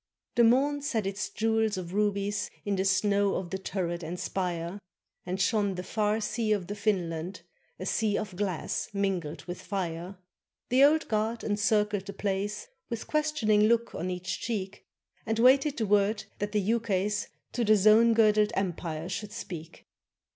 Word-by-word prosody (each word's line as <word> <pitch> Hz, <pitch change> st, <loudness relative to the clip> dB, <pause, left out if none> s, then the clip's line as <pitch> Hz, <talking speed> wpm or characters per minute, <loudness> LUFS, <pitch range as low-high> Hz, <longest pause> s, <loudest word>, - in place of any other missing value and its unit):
The 240 Hz, -, +4 dB
morn 275 Hz, +5 st, +3 dB
set 225 Hz, -7 st, -1 dB
its 195 Hz, +1 st, -3 dB
jewels 220 Hz, -2 st, +1 dB
of 180 Hz, -1 st, -6 dB
rubies 205 Hz, 0 st, 0 dB, 0.2 s
In 205 Hz, -1 st, 0 dB
the 190 Hz, 0 st, 0 dB
snows 200 Hz, +1 st, +2 dB
of 180 Hz, -2 st, -5 dB
the 190 Hz, -, -2 dB
turret 175 Hz, -3 st, -3 dB
and 170 Hz, +2 st, -5 dB
spire, 175 Hz, 0 st, -3 dB, 0.5 s
And 185 Hz, +1 st, -2 dB
shone 200 Hz, 0 st, +1 dB
the 180 Hz, -, -4 dB
far 210 Hz, +2 st, 0 dB
sea 215 Hz, 0 st, 0 dB
of 200 Hz, -4 st, -1 dB
the 200 Hz, -, -5 dB
Finland 185 Hz, -4 st, -2 dB, 0.4 s
A 185 Hz, -, -6 dB
sea 210 Hz, 0 st, +1 dB
of 190 Hz, -4 st, -4 dB
glass 185 Hz, -3 st, -2 dB
mingled 195 Hz, -6 st, -2 dB
with 175 Hz, 0 st, -6 dB
fire. 180 Hz, -1 st, -4 dB, 0.5 s
The 255 Hz, +2 st, +5 dB
Old 310 Hz, +2 st, +4 dB
Guard 220 Hz, +2 st, -1 dB
encircled 210 Hz, -1 st, +1 dB
the 200 Hz, -, -5 dB
place 200 Hz, +1 st, -2 dB, 0.2 s
With 230 Hz, -2 st, -4 dB
questioning 300 Hz, -9 st, +2 dB
look 235 Hz, +1 st, +2 dB
on 180 Hz, -, -3 dB
each 180 Hz, 0 st, -3 dB
cheek, 200 Hz, -5 st, -4 dB, 0.4 s
And 225 Hz, 0 st, 0 dB
waited 270 Hz, +5 st, +5 dB
the 225 Hz, -, 0 dB
word 205 Hz, +1 st, +2 dB, 0.2 s
that 205 Hz, 0 st, -2 dB
the 210 Hz, -, +1 dB
ukase 205 Hz, -1 st, 0 dB, 0.2 s
To 240 Hz, -, -1 dB
the 215 Hz, -1 st, +5 dB
zone 215 Hz, +3 st, +6 dB
girdled 215 Hz, -1 st, +4 dB
empire 170 Hz, -4 st, -2 dB
should 205 Hz, +2 st, -4 dB
speak. 165 Hz, -3 st, -8 dB
205 Hz, 165 wpm, -29 LUFS, 185-220 Hz, 0.5 s, zone